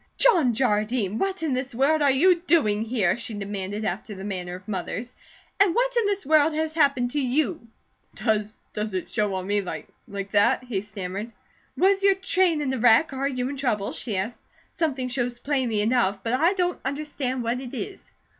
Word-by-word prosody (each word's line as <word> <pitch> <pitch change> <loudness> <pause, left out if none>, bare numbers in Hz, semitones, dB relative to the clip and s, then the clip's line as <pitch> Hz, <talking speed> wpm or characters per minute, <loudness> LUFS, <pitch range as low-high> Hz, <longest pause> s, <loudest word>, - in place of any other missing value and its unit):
"John 330 - +5
Jardine, 215 -3 +1
what 390 -2 -1
in 305 -4 0
the 255 +1 -3
world 300 +4 +3
are 285 - +4
you 340 +6 +4
doing 215 -11 +3
here?" 220 -4 +1
she 230 -2 -4
demanded 200 +1 -4
after 200 +3 -4
the 190 - -8
manner 180 -3 -4
of 185 +1 -12
mothers, 215 +5 -4 0.5
"and 390 -4 +4
what - - +1
in 465 -3 +2
this 400 -1 -1
world 305 +1 +4
has 315 0 -1
happened 275 -6 +2
to 290 - 0
you?" 275 +1 -1 0.5
"Does 215 -1 -1 0.2
it 210 -4 -3
show 210 -2 0
on 185 -1 -3
me 205 +1 +1
like 185 - -7 0.4
that?" 235 +5 +3
he 230 -6 -3
stammered. 200 +2 -6 0.5
"Was 390 +2 +3
your 395 -1 +5
train 370 -5 +1
in 265 -2 -1
a 260 - -2
wreck? 245 +6 +5
Are 270 +1 -1
you 255 -2 -2
in 280 - -5
trouble?" 230 -7 -1
she 215 -6 -3
asked. 220 +6 -3 0.3
"Something 275 -7 -1
shows 245 -1 -2
plainly 255 -6 0
enough, 210 -4 +1
but 230 - -1
I 325 +9 +3
don't 360 -2 -1
understand 270 -2 -3
what 235 +2 -1
it 260 0 -7
is." 385 - -7
250 Hz, 190 wpm, -25 LUFS, 210-305 Hz, 0.5 s, John